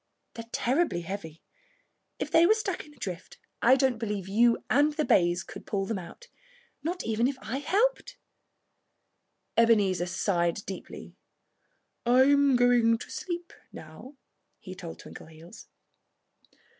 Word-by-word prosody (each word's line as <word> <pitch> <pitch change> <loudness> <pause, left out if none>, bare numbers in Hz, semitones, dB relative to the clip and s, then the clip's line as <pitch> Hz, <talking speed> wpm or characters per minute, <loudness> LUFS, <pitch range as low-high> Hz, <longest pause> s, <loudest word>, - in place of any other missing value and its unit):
They're 230 0 -9
terribly 260 - 0
heavy. 165 -3 -7 0.7
If - - -4
they 330 +1 +6
were 435 - +5
stuck 395 -7 -4
in 295 - -17
a - - -25
drift 185 -6 -7 0.2
I 255 +3 +6
don't 260 -3 +1
believe 205 -4 -3
you 230 +4 +3
and 295 +3 +3
the 305 0 -1
bays 175 0 +2
could - - -11
pull 195 -1 -1
them 200 -1 -3
out 315 - -12 0.5
not 345 +5 -3
even 225 +2 +1
if 270 -1 -3
I 255 +1 -4
helped 480 +11 0
you." 230 - -9
Ebenezer 195 -6 +2
sighed 175 +1 -1
deeply. 190 - -9 0.9
"I'm 270 +3 +4
going 245 -2 +4
to - - -10
sleep 345 -1 -5 0.2
now," 160 - -12 0.4
he 185 - -10
told 170 -3 -9
Twinkleheels. 160 +6 -13
230 Hz, 135 wpm, -28 LUFS, 185-285 Hz, 0.9 s, they